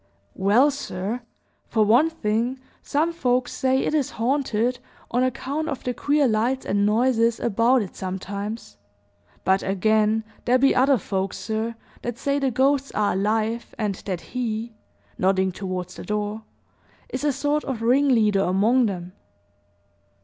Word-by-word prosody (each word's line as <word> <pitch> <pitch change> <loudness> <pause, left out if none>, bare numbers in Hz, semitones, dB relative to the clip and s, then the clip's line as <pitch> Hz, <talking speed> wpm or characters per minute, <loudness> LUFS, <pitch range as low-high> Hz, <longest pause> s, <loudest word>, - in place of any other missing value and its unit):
"Well, 215 +9 +4
sir, 225 -4 -4 0.5
for 220 -2 +2
one 245 +10 +5
thing, 240 -3 -1 0.2
some 320 +4 0
folks 250 -5 0
say 260 0 +1
it - - -1
is 295 -4 +1
haunted, 245 -1 0 0.3
on 245 - +1
account 275 +5 -1
of 280 - -4
the 250 - -1
queer 290 +3 +2
lights 240 +4 0
and 200 +1 +1
noises 230 +1 +2
about 235 +2 +3
it, 190 - -10
sometimes; 200 +4 -5 0.7
but, 190 +1 +3
again, 215 +3 +2 0.2
there 250 +1 +4
be 275 +2 +4
other 265 +1 +4
folks, 190 -1 -3
sir, 225 +1 -3 0.3
that 240 -1 -4
say 280 +2 0
the 275 -1 +1
ghosts 270 +3 +1
are 210 -1 +1
alive, 220 +4 -1
and 210 -3 -1
that 185 -3 -2
he" 230 -2 -4 0.5
nodding 190 0 +2
toward 185 -1 -4
the 180 - -9
door 210 +1 -3 0.6
"is 255 - -4
a 295 - +3
sort 290 +2 0
of 240 -4 -3
ringleader 235 -5 +3
among 220 +7 +3
them." 180 -2 -5
230 Hz, 145 wpm, -24 LUFS, 205-260 Hz, 0.7 s, one